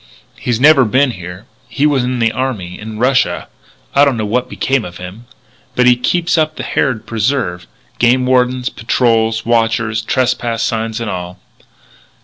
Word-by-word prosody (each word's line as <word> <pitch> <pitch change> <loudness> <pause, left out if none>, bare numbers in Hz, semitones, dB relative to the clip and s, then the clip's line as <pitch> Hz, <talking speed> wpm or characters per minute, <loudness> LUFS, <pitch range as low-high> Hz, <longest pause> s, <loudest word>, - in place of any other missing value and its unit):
He's 120 -2 -2
never 145 0 +6
been 130 +4 +2
here 90 0 -9 0.2
he 145 - 0
was 140 -4 +2
in 125 0 -1
the 115 -1 +2
army 110 -10 -4
in 110 0 -7
Russia 125 +2 +1 0.5
I 140 - +5
don't 140 -4 +2
know 110 - -2
what 120 +4 -1
became 135 -3 0
of 90 -2 -8
him 95 +7 -10 0.5
but 125 - +3
he 125 0 +6
keeps 170 +7 0
up 155 0 0
the - - -5
Harrod 125 -6 -1
preserve 110 -6 -1 0.3
game 125 +2 +3
wardens, 125 0 +1
patrols, 115 -1 0
watchers, 115 -1 +1
trespass 120 -1 0
signs 110 0 -2
and 115 - -4
all." 90 0 -6
120 Hz, 160 wpm, -15 LUFS, 110-130 Hz, 0.5 s, never